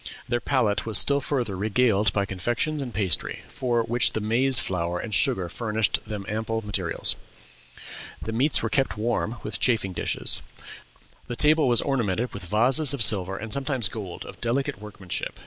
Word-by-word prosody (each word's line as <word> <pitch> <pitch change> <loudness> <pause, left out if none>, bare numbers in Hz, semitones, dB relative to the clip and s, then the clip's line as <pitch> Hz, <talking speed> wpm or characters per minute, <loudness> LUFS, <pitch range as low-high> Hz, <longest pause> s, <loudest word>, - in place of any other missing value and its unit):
Their 120 - 0
palate 110 -7 +1
was 110 - +3
still 140 0 +4
further 125 -8 -2
regaled 105 0 +2
by 100 +1 0
confections 120 +11 -2
and 130 -3 -5
pastry, 95 -6 -1
for 120 -2 -1
which 120 +2 +2
their 110 - -2
maize 125 +4 +3
flower 90 -3 -1
and 110 +2 -6
sugar 95 -2 +2
furnished 110 +3 -1
them 105 -2 -5
ample 110 +1 -3
materials. 95 -5 -1 1.0
The 110 - -5
meats 135 +6 +2
were - - -1
kept 135 -6 0
warm 115 +1 -1
with 105 - -3
chafing 110 -6 +1
dishes. - - +1 0.9
The 120 - -4
table 155 +3 +3
was 120 -2 +4
ornamented 120 -4 -1
with 100 -2 -7
vases 130 - +3
of 125 - +2
silver 95 -3 +4
and 110 +1 -4
sometimes 135 -5 +2
gold 100 -6 -7
of - - -12
delicate 120 -3 -1
workmanship. 100 -4 -5
110 Hz, 165 wpm, -25 LUFS, 100-125 Hz, 1.0 s, still